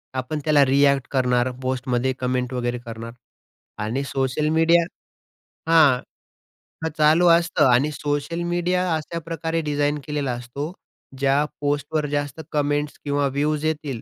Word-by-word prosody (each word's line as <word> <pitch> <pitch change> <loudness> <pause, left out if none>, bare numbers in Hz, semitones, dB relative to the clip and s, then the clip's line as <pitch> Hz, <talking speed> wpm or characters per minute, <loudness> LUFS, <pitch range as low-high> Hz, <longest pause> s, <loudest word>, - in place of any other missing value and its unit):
आपण 130 +4 -3
त्याला 150 -2 +4
रिऍक्ट 140 0 +3
करणार, 125 -1 +2
पोस्टमध्ये 130 0 -1
कमेंट 125 0 -1
वगैरे 120 -1 -1
करणार 115 0 -7 0.7
आणि 120 +6 -2
सोशल 135 +2 -1
मीडिया 165 +2 +4 0.9
हां, 155 -6 +6 0.9
हां, 160 - 0
चालू 155 +3 +5
असतं. 170 -2 +4
आणि 135 +5 +3
सोशल 145 +3 -2
मीडिया 180 0 +1
अशाप्रकारे 165 +1 -3
डिझाइन 145 0 +1
केलेला 145 -3 -1
असतो, 120 +6 -5 0.5
ज्या 140 +1 +3 0.2
पोस्टवर 145 +1 -1
जास्त 145 +1 -3
कमेंट्स 145 0 -1
किंवा 145 -1 +1
व्ह्यूज 145 +3 -1
येतील, 150 -6 -2
145 Hz, 125 wpm, -23 LUFS, 130-155 Hz, 0.9 s, हां